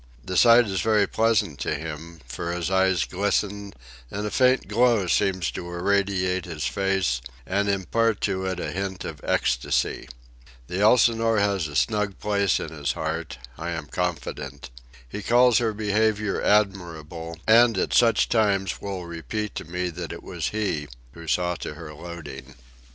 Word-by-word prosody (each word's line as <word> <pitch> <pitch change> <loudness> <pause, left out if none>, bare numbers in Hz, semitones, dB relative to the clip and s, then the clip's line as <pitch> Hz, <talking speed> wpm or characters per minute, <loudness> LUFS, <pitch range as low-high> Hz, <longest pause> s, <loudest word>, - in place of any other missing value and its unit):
The 90 - -4
sight 120 +3 +7
is 95 -3 -1
very 105 -1 +3
pleasant 105 -7 +1
to - - -1
him, 80 +1 -7
for 85 +7 -4
his 90 0 -2
eyes 95 -3 +3
glisten 100 +1 -1 0.4
and 105 +1 -4
a 105 - -3
faint 130 0 +3
glow 115 -1 +3
seems 90 -4 +1
to 85 +7 -6
irradiate 95 0 0
his 80 -3 -4
face 95 -11 0 0.2
and 100 +2 0
impart 105 +3 +1
to 95 -2 -1
it 95 -1 -3
a - - -3
hint 95 0 -4
of 75 -4 -7
ecstasy. 65 +1 0 0.6
The 90 +8 -4
Elsinore 115 0 +4
has 100 -5 +1
a 75 - -9
snug 105 +1 0
place 100 -3 +1
in - - -5
his 75 -3 -2
heart, 80 -2 -4 0.2
I 85 +1 -4
am 80 -2 -5
confident. 85 -5 -4 0.4
He 100 - -6
calls 120 +3 +5
her 115 -2 +1
behaviour 105 0 0
admirable, 85 -5 0
and 115 -1 +5
at - - 0
such 115 -3 +4
times 100 -4 +1
will 95 -3 -5
repeat 95 +5 -4
to - - -6
me 90 +2 -3
that 85 -1 -6
it - - -8
was - - -3
he 100 -9 -2 0.2
who 85 -1 -12
saw 90 +2 +1
to 75 - -6
her 80 -1 -9
loading. 75 -5 -9
95 Hz, 160 wpm, -25 LUFS, 85-105 Hz, 0.6 s, sight